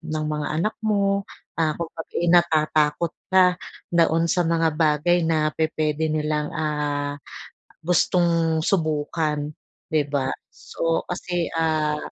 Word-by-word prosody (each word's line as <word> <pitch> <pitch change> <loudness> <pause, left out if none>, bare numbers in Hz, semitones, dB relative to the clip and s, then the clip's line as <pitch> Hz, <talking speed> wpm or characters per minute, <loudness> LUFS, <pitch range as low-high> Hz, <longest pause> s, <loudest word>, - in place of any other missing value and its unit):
ng 155 -1 -3
mga 150 -1 -2
anak 210 +7 0
mo. 200 -2 0 0.3
Ah, 160 -2 +1
kumbaga 165 -1 -6
eh, 175 - 0
natatakot 160 -2 +2 0.2
ka 185 -1 +5 0.4
doon 165 0 +3
sa 175 +1 +2
mga 165 -1 +1
bagay 160 +2 +2
na 155 -2 +1
pupuwede 155 0 0
nilang 150 -1 -1
ah, 150 -2 -2 0.7
gustong 170 -1 +2
subukan, 155 -3 -1 0.4
'di 155 -2 +1
ba? 135 -2 0 0.2
So 165 +9 -3
kasi 175 -1 -2
ah, 155 -2 +1
160 Hz, 120 wpm, -23 LUFS, 150-170 Hz, 0.7 s, ka